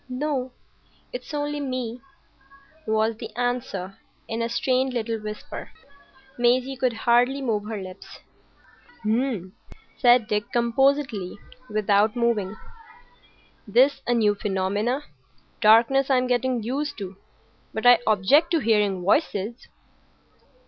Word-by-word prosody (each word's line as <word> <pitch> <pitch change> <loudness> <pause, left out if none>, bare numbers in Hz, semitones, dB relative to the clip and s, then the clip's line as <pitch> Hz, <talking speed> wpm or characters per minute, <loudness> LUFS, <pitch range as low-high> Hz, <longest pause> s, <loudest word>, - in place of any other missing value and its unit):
"No; 260 -1 -2 0.6
it's - - -7
only 295 0 -2
me," 255 -3 -4 0.9
was 220 0 +1
the - - -7
answer, 240 -6 -3 0.3
in 225 +1 -3
a 230 - -1
strained 255 +2 0
little 225 -1 -2
whisper. 210 0 -7 0.7
Maisie 250 +2 +2
could 255 -2 0
hardly 240 +4 +2
move 220 -6 -1
her 215 -1 -4
lips. 185 -1 -10 0.9
"H'm!" 220 -5 -1 0.5
said 245 -3 +5
Dick, 210 -2 -2
composedly, 240 -4 +1 0.3
without 210 +1 +2
moving. 225 -5 0 1.1
"This 255 +7 +5
is - - -25
a 240 - +2
new 215 -3 +3
phenomenon. 205 +6 -1 0.6
Darkness 235 +5 +5
I'm 255 -2 +3
getting 250 -1 0
used 280 +6 -3
to; 195 -3 -7 0.6
but 220 - -5
I 245 -2 +8
object 220 - +4
to 330 - +4
hearing 210 -6 +1
voices." 210 - 0
235 Hz, 115 wpm, -24 LUFS, 210-255 Hz, 1.1 s, I